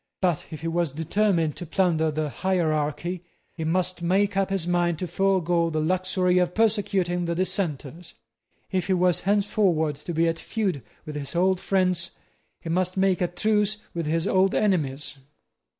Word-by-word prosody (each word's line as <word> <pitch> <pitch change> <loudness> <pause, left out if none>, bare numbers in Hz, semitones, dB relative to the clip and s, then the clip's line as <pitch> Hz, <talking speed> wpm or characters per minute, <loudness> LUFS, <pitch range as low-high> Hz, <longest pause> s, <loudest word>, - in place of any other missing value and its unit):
But 175 -5 0
if 155 -2 -8
he 165 - -3
was 165 -3 0
determined 165 0 +1
to 175 - -6
plunder 165 -3 +2
the 155 0 -2
hierarchy, 165 0 -1 0.3
he 160 - -5
must 180 +2 0
make 195 +4 +1
up 195 0 +1
his 195 -3 -1
mind 175 -1 +1
to 180 - -3
forego 175 -3 +1
the 155 -1 -1
luxury 180 +2 +1
of 180 -1 0
persecuting 195 -5 +1
the 170 0 -1
Dissenters. 170 -3 -3 0.6
If 185 -2 0
he 190 - +2
was 180 -1 +3
henceforward 195 -7 +2
to 150 +4 -6
be 165 0 +2
at 165 0 -1
feud 195 - -2 0.2
with 150 - -6
his 145 +2 -5
old 185 +1 +2
friends, 180 -3 0 0.4
he 165 - -6
must 185 +2 0
make 190 -2 +2
a 180 - +2
truce 210 +3 +1 0.2
with 170 -2 -3
his 165 +1 0
old 190 0 +3
enemies. 150 -8 0
175 Hz, 165 wpm, -25 LUFS, 160-190 Hz, 0.6 s, was